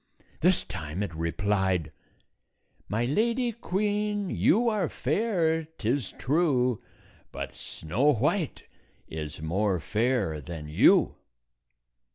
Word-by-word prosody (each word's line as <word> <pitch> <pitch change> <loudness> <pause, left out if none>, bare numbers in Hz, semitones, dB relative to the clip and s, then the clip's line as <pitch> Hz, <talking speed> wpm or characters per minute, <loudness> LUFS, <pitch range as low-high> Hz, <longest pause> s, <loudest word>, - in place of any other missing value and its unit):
This 180 +2 +3
time 85 +1 -4
it 95 - -4
replied, 95 +1 0 1.0
"My 110 +5 0
Lady 235 - +1
Queen, 205 -2 -1
you 235 +5 +3
are 210 -8 +1
fair, 165 - +1 0.2
't 110 - -4
is 130 +2 0
true; 130 -5 +1 0.5
But - - -5
Snow 115 - 0
White 150 - 0 0.4
is 75 -1 -6
more 95 +3 +1
fair 105 - 0
than 75 0 -7
you." 75 - +4
125 Hz, 105 wpm, -28 LUFS, -, 1.0 s, you